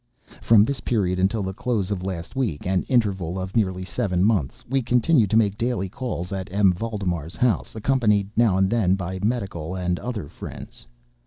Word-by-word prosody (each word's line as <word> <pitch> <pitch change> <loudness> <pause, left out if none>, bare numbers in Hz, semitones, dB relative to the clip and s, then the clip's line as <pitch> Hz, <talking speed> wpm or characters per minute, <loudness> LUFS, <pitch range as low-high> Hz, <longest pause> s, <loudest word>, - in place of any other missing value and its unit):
From 110 -2 +6
this 140 +1 -2
period 95 -6 0
until 100 +3 +1
the 95 0 -3
close 105 -2 -1
of 95 -3 -2
last 90 +1 -5
week—an 95 - 0
interval 95 -8 +1
of 95 0 -5
nearly 95 -4 0
seven 95 -3 0
months—we 110 - 0
continued 125 - +3
to 110 - +3
make 105 -2 +2
daily 115 -5 -1
calls 105 -6 -4
at 95 -2 -5
M. 100 -1 +4
Valdemar's 90 -6 -3
house, 120 +2 0
accompanied, 110 -4 +2
now 110 -5 +3
and 95 0 +3
then, 95 -4 +2
by 95 0 -4
medical 95 -7 -2
and 90 -1 -1
other 115 -10 -4
friends. 60 - -10
100 Hz, 170 wpm, -24 LUFS, 90-115 Hz, -, From